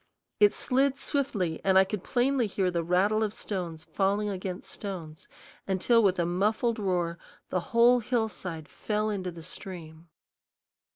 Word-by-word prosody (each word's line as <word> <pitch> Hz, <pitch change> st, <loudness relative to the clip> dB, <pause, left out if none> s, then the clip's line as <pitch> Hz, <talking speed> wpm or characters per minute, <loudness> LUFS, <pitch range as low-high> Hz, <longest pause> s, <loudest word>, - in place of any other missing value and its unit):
It 205 Hz, -1 st, +7 dB
slid 270 Hz, +2 st, +2 dB
swiftly, 210 Hz, -, -1 dB
and 190 Hz, -1 st, +4 dB
I 190 Hz, -, +8 dB
could 195 Hz, 0 st, -5 dB
plainly 250 Hz, -1 st, +1 dB
hear 190 Hz, -2 st, 0 dB
the 170 Hz, -1 st, -1 dB
rattle 190 Hz, +6 st, +2 dB
of 215 Hz, -1 st, 0 dB
stones 170 Hz, -6 st, -4 dB
falling 200 Hz, +3 st, 0 dB
against 185 Hz, -1 st, -5 dB
stones, 175 Hz, -5 st, -7 dB, 0.4 s
until 200 Hz, +5 st, +3 dB
with 195 Hz, -3 st, +3 dB
a 170 Hz, -, +1 dB
muffled 215 Hz, +6 st, 0 dB
roar 175 Hz, -4 st, -1 dB, 0.3 s
the 185 Hz, -, 0 dB
whole 240 Hz, +1 st, +5 dB
hillside 210 Hz, -, -3 dB
fell 215 Hz, +5 st, -2 dB
into 190 Hz, -3 st, -3 dB
the 170 Hz, -2 st, -10 dB
stream. 165 Hz, -3 st, -9 dB
195 Hz, 150 wpm, -28 LUFS, 180-220 Hz, 0.4 s, I